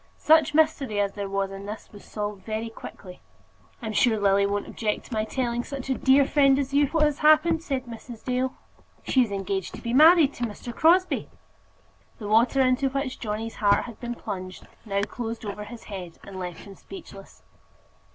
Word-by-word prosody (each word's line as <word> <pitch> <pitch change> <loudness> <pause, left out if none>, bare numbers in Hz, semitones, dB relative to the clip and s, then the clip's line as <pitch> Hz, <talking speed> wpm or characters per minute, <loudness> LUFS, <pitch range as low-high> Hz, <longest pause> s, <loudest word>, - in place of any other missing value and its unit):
Such 310 -1 +4
mystery 295 -9 +2
as 200 -1 0
there 200 -1 -5
was 195 0 -1
in 195 +1 -8
this 215 +1 -8
was 205 - -13
solved 205 -2 -5
very 220 +2 -4
quickly. 180 -4 -11 0.6
"I'm 220 -1 -3
sure 220 0 +3
Lily 200 0 +3
won't 205 0 -2
object 210 -2 -3
to - - -9
my 215 -1 0
telling 240 0 -2
such 270 -1 -5
a - - +4
dear 270 +2 +4
friend 275 -1 +4
as 275 -1 -2
you 285 0 +4
what 315 +2 +1
has 295 -1 +1
happened," 310 +1 +4
said 270 -6 -3
Mrs. 230 -1 -10
Dale. 255 +1 -1 0.5
"She 260 - +3
is 230 -4 0
engaged 195 -1 -3
to - - -10
be 235 - -2
married 310 +1 +7
to 240 - -3
Mr. 230 +2 -7
Crosbie." 360 +3 +3 0.9
The 210 - -7
water 235 +5 +3
into 260 +1 +2
which 275 -1 -3
Johnny's 220 0 -4
heart 205 -2 +3
had 235 - -10
been 240 -1 -5
plunged 185 -4 -7 0.2
now 200 -1 -1
closed 230 +1 -5
over 210 0 -5
his 235 +1 -10
head 185 -5 -8
and 190 -1 -9
left 180 -2 -6
him 200 - -11
speechless. 200 - -12
235 Hz, 190 wpm, -25 LUFS, 205-275 Hz, 0.9 s, married